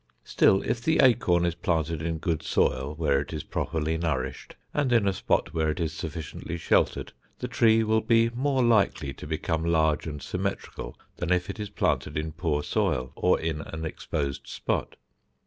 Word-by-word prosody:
Still 95 Hz, +1 st, +3 dB
if 120 Hz, +1 st, -1 dB
the 160 Hz, +5 st, +2 dB
acorn 100 Hz, -9 st, +4 dB
is 85 Hz, -, +1 dB
planted 85 Hz, -2 st, -1 dB
in 80 Hz, 0 st, -2 dB
good 80 Hz, -1 st, -1 dB
soil, 65 Hz, +4 st, 0 dB
where 75 Hz, -3 st, +2 dB
it 70 Hz, -, -5 dB
is 80 Hz, -3 st, -4 dB
properly 80 Hz, 0 st, -2 dB
nourished 65 Hz, -6 st, -3 dB, 0.2 s
and 145 Hz, -4 st, +1 dB
in 115 Hz, -4 st, +4 dB
a 100 Hz, -, +2 dB
spot 80 Hz, -, 0 dB
where 80 Hz, -2 st, +1 dB
it 75 Hz, -, -2 dB
is 80 Hz, -2 st, -1 dB
sufficiently 80 Hz, +1 st, -5 dB
sheltered, -, -, +1 dB, 0.2 s
the -, -, -4 dB
tree 115 Hz, -1 st, +4 dB
will 110 Hz, 0 st, +2 dB
be 115 Hz, 0 st, +3 dB
more 130 Hz, +1 st, +1 dB
likely 100 Hz, -, +2 dB
to -, -, -9 dB
become 80 Hz, +1 st, -1 dB
large 80 Hz, -2 st, +2 dB
and 75 Hz, -2 st, -6 dB
symmetrical, -, -, -4 dB, 0.2 s
than 85 Hz, -, -2 dB
if 90 Hz, +1 st, +1 dB
it -, -, -12 dB
is 105 Hz, -1 st, -4 dB
planted -, -, 0 dB
in 80 Hz, +1 st, -2 dB
poor 75 Hz, -2 st, -1 dB
soil 65 Hz, -3 st, 0 dB
or -, -, +2 dB
in 80 Hz, -2 st, -2 dB
an 80 Hz, +1 st, -6 dB
exposed 70 Hz, -3 st, -3 dB
spot. -, -, -2 dB
80 Hz, 180 wpm, -27 LUFS, 75-100 Hz, 0.2 s, acorn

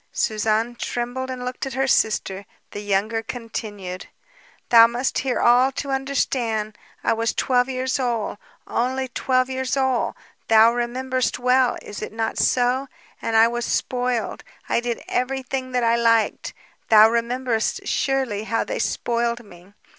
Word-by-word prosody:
Suzanne 220 Hz, +2 st, 0 dB
trembled 245 Hz, +2 st, -4 dB
and 255 Hz, -1 st, -5 dB
looked 250 Hz, +2 st, -4 dB
at 265 Hz, -, -6 dB
her 270 Hz, 0 st, +1 dB
sister. 200 Hz, -6 st, 0 dB, 0.2 s
The -, -, -6 dB
younger 205 Hz, +2 st, 0 dB
continued: 210 Hz, -5 st, -6 dB, 0.6 s
"Thou 230 Hz, -1 st, +8 dB
must 245 Hz, +3 st, -1 dB
hear 260 Hz, -2 st, -1 dB
all, 250 Hz, +3 st, +5 dB
to 280 Hz, +1 st, -4 dB
understand. 245 Hz, -5 st, -1 dB, 0.3 s
I -, -, +2 dB
was 225 Hz, 0 st, -1 dB
twelve 250 Hz, 0 st, +2 dB
years 260 Hz, +1 st, -1 dB
old, 235 Hz, -5 st, -2 dB, 0.3 s
only 260 Hz, +2 st, -1 dB
twelve 255 Hz, 0 st, +1 dB
years 260 Hz, 0 st, -2 dB
old; 265 Hz, -2 st, 0 dB, 0.3 s
thou 225 Hz, +1 st, +6 dB
rememberest 255 Hz, +1 st, -1 dB
well, 250 Hz, 0 st, +2 dB
is 205 Hz, -, -8 dB
it -, -, -5 dB
not 225 Hz, 0 st, -2 dB
so? 255 Hz, +2 st, +2 dB, 0.3 s
And 225 Hz, -, -2 dB
I 225 Hz, +1 st, +7 dB
was 240 Hz, +1 st, -3 dB
spoiled, 245 Hz, -1 st, -1 dB, 0.2 s
I -, -, +1 dB
did 240 Hz, -1 st, -4 dB
everything 260 Hz, 0 st, -2 dB
that 250 Hz, -1 st, +1 dB
I 230 Hz, 0 st, +3 dB
liked! 230 Hz, -1 st, +1 dB, 0.3 s
Thou 215 Hz, -1 st, +8 dB
rememberest, 235 Hz, 0 st, -1 dB
surely, 260 Hz, -6 st, 0 dB
how 225 Hz, +1 st, 0 dB
they -, -, -4 dB
spoiled 235 Hz, 0 st, -1 dB
me? 180 Hz, +1 st, -17 dB
240 Hz, 145 wpm, -22 LUFS, 225-255 Hz, 0.6 s, Thou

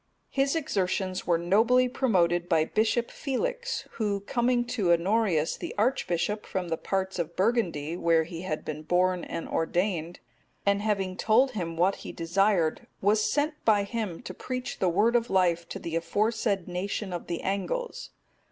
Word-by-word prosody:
His 275 Hz, +2 st, +1 dB
exertions 190 Hz, -, -1 dB
were 170 Hz, -2 st, +4 dB
nobly 225 Hz, +9 st, +3 dB
promoted 175 Hz, -9 st, +1 dB
by 160 Hz, -3 st, +3 dB
Bishop 225 Hz, +5 st, +1 dB
Felix,(248) 485 Hz, -, -3 dB
who, 205 Hz, -2 st, 0 dB
coming 240 Hz, +3 st, +1 dB
to 210 Hz, -7 st, 0 dB
Honorius, 175 Hz, -2 st, +2 dB
the -, -, -6 dB
archbishop,(249) 210 Hz, -4 st, 0 dB
from 185 Hz, -2 st, -2 dB
the 165 Hz, -, -1 dB
parts 190 Hz, 0 st, -2 dB
of 170 Hz, 0 st, -3 dB
Burgundy, 180 Hz, -8 st, 0 dB
where 165 Hz, -2 st, +3 dB
he 165 Hz, +1 st, -7 dB
had 160 Hz, -4 st, -4 dB
been 155 Hz, 0 st, -4 dB
born 180 Hz, +2 st, +1 dB
and 165 Hz, -, -5 dB
ordained, 175 Hz, 0 st, -1 dB, 0.5 s
and 200 Hz, 0 st, +2 dB
having 195 Hz, -3 st, -1 dB
told 245 Hz, +5 st, +4 dB
him 170 Hz, -7 st, -4 dB
what 185 Hz, +3 st, +2 dB
he -, -, -8 dB
desired, 175 Hz, -1 st, +1 dB
was 210 Hz, +2 st, +2 dB
sent 300 Hz, +1 st, -1 dB
by 210 Hz, -2 st, +4 dB
him 210 Hz, -3 st, -4 dB
to -, -, -6 dB
preach 255 Hz, 0 st, -5 dB
the 185 Hz, -, +2 dB
Word 220 Hz, +7 st, +3 dB
of 235 Hz, 0 st, +2 dB
life 170 Hz, -3 st, +2 dB
to -, -, -5 dB
the 165 Hz, -1 st, -5 dB
aforesaid 205 Hz, +2 st, 0 dB
nation 185 Hz, +2 st, -3 dB
of 175 Hz, -, -5 dB
the 170 Hz, -1 st, -3 dB
Angles. 480 Hz, -, -3 dB
195 Hz, 160 wpm, -28 LUFS, 170-230 Hz, 0.5 s, were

